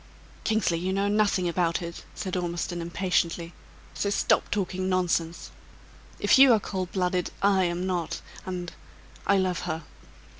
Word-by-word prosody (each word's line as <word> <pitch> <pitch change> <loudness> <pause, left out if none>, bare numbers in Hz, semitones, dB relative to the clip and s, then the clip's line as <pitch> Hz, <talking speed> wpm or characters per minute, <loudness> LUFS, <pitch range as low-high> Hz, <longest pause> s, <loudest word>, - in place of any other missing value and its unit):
"Kingsley, 215 -6 +1
you 185 +2 -1
know 195 +1 +1
nothing 205 -3 +2
about 170 -1 +1
it!" 170 -1 -7
said 185 -1 -3
Ormiston, 175 0 -2
impatiently. 170 -1 -1 0.4
"So 200 - -1
stop 205 - +2
talking 185 -2 -1
nonsense. 170 -2 0 0.7
If - - +4
you 270 -1 +9
are 220 - +4
cold 185 -3 -4
blooded, 180 -1 0
I 195 -2 +4
am 175 +1 -1
not; 175 -3 -2 0.2
and 180 -1 -5 0.5
I 200 - +5
love 185 -2 +1
her!" 160 +1 -3
180 Hz, 145 wpm, -27 LUFS, 170-190 Hz, 0.7 s, you